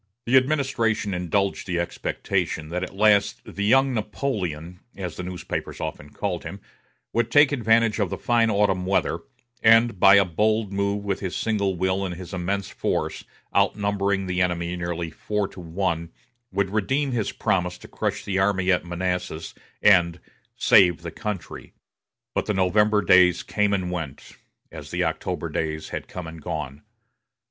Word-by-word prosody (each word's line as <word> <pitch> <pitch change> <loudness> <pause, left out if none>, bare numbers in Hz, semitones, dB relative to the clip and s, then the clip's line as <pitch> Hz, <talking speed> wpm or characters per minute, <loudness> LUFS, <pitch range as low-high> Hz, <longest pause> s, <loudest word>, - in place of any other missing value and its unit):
The 120 - +2
administration 130 -7 +2
indulged 95 +3 -1
the 90 -2 -1
expectation 85 -2 -2
that 90 +2 -2
at 95 - -5
last 105 0 +3
"The 100 - -5
Young 135 +5 +4
Napoleon," 95 - -3 0.2
as 90 -4 -5
the - - -5
newspapers 90 -1 -5
often 75 - -5
called - - -3
him, - - -7 0.5
would 120 -1 +1
take 145 +3 +6
advantage 115 -4 +2
of 100 -4 +1
the - - -4
fine 115 -1 +2
autumn 100 -3 +1
weather, 95 - +1 0.4
and, 115 -2 +5
by 95 +1 +8
a 100 -1 +6
bold 105 +4 0
move 100 +1 -1
with 100 -2 -1
his 95 -3 -4
single 100 -4 0
will 95 +2 0
and 90 -2 -3
his 90 +2 -9
immense 95 +2 -2
force, - - -2 0.3
outnumbering 100 -1 +1
the 90 0 -1
enemy 90 -1 0
nearly 85 -1 -3
four 105 +3 -2
to - - -12
one, 85 -1 -2 0.4
would 95 0 0
redeem 135 +7 0
his 115 -4 -1
promise 90 -1 -1
to - - -13
crush - - -3
the 95 -1 0
army 95 -1 +2
at 90 - +2
Manassas 90 -2 -3 0.3
and 90 -4 +5 0.4
"save 85 -3 +5
the 85 - -5
country." 105 -1 -6 0.6
But - - -1
the 105 - 0
November 105 +3 +3
days 90 -1 +5
came 105 -1 0
and 95 -3 -1
went, 80 -6 -6 0.4
as - - -9
the - - -1
October - - -2
days 80 -1 -3
had - - -5
come 90 -2 -7
and 80 0 -9
gone. 70 0 -5
95 Hz, 160 wpm, -24 LUFS, 90-105 Hz, 0.6 s, by